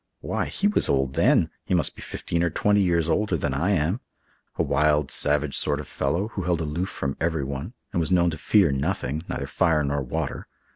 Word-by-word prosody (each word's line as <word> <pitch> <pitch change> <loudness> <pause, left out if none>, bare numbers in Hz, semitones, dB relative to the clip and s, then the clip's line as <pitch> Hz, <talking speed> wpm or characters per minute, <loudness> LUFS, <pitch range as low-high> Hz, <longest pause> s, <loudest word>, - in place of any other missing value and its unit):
Why, - - -2
he 200 - 0
was 210 - +2
old 65 -1 +1
then! - - +3
He 90 - 0
must 85 - +1
be - - -11
fifteen 85 - -3
or 85 - +2
twenty 105 +5 +2
years 85 -4 +2
older 100 0 +1
than 70 -2 -1
I 75 +8 0
am. 90 +3 +1 0.6
A - - +1
wild, 75 -2 +2
savage 75 +1 +1
sort 75 -1 0
of 75 - -7
fellow, 85 +10 -1
who 100 - -4
held 85 -2 0
aloof 80 +4 -2
from 70 0 -3
everyone 75 - -2 0.2
and - - +1
was 80 - 0
known 85 -2 +3
to 80 - -5
fear 95 -2 +4
nothing—neither 70 0 -2
fire 80 +1 +2
nor 70 0 -1
water. 65 - -4
80 Hz, 200 wpm, -25 LUFS, 70-90 Hz, 0.6 s, fear